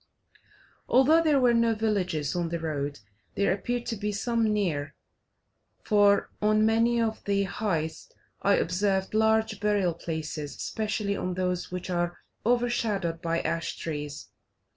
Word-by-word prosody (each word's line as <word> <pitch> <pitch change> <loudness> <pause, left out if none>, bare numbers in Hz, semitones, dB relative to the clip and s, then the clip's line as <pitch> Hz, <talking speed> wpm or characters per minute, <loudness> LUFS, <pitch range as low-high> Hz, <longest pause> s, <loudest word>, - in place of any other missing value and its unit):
Although 290 +6 +5
there 305 -4 +3
were 245 -2 +4
no 230 -1 +3
villages 185 -9 -1
on 170 -2 -1
the 170 - -2
road, 145 -5 -3 0.3
there 200 -1 +2
appeared 240 +5 -3
to 230 - -2
be 210 0 -2
some 225 +2 0
near, 165 -9 -1 0.9
for 205 -2 +3
on 215 +1 +3
many 230 +2 +3
of 225 -1 -1
the 200 0 +1
heights 180 -6 -3 0.3
I 200 0 +4
observed 190 +2 0
large 220 -1 +2
burial 205 -4 +1
places, 155 -3 -5
especially 210 -2 -2
on 180 -2 -3
those 180 -1 -2
which 180 0 -5
are 175 0 -1 0.3
overshadowed 220 -8 0
by 165 -1 0
ash 165 0 -2
trees. 150 -2 -5
200 Hz, 140 wpm, -27 LUFS, 170-220 Hz, 0.9 s, Although